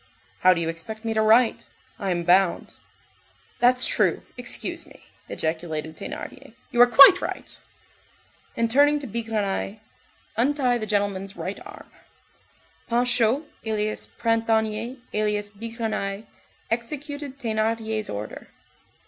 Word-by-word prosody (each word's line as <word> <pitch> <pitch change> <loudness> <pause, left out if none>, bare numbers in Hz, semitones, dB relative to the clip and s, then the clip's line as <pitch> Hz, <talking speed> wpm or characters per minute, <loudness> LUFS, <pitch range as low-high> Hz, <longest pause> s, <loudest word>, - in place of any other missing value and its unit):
"How 185 - +6
do - - -2
you 165 - -1
expect 215 +7 -5
me 225 - 0
to 220 - +2
write? 225 +2 +3 0.3
I 195 - -2
am 175 -1 0
bound." 180 +1 +3 0.9
"That's 250 +1 +4
true, - - +1
excuse - - -4
me!" - - -17 0.3
ejaculated 160 -1 -3
Thénardier, - - -8 0.2
"you 240 - +4
are 245 - +9
quite 275 +10 +9
right." - - -5 1.0
And 230 -1 +1
turning 290 +3 +5
to 290 - -6
Bigrenaille:— 215 -2 -2 0.6
"Untie 255 -1 +2
the 215 - -4
gentleman's 200 -2 -1
right - - -5
arm." - - -13 1.0
Panchaud, 245 +2 +2 0.2
alias 215 -1 -2
Printanier, 225 +1 0 0.2
alias 210 -1 0
Bigrenaille, 215 -2 -4 0.5
executed 285 +3 -4
Thénardier's 220 -2 -1
order. 105 +1 -6
220 Hz, 115 wpm, -24 LUFS, 200-240 Hz, 1.0 s, are